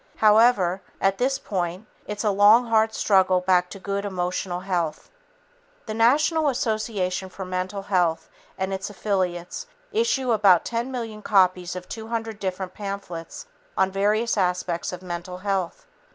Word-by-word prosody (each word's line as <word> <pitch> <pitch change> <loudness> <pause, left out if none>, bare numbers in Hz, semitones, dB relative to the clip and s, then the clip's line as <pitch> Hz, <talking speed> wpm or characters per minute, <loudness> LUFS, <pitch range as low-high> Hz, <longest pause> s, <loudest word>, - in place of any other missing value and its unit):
However, 210 -4 +4 0.2
at 195 0 +1
this 265 +2 +1
point 180 -1 -3 0.2
it's 210 0 -4
a 210 - +2
long 205 +5 +6
hard 220 -1 +3
struggle 190 -4 +3
back 180 -1 +2
to - - -8
good 200 +1 -3
emotional 180 -2 -2
health. 175 - -2 0.7
The 215 - -4
National 295 +7 +3
Association 215 -7 -1
for 190 +1 -7
Mental 185 +2 -3
Health 180 -5 +1 0.3
and 190 0 -2
its 190 +1 -4
affiliates 190 - -2 0.2
issue 430 - +1
about 200 -5 +5
10 235 +2 -2
million 225 -4 -5
copies 185 -3 +2
of 180 0 -7
200 225 -1 -5
different 185 -1 -4
pamphlets 195 -5 -6 0.3
on 190 0 +2
various 210 +4 +1
aspects 180 -2 -1
of 180 0 -8
mental 180 0 -6
health. 190 -2 -2
195 Hz, 140 wpm, -24 LUFS, 180-220 Hz, 0.7 s, long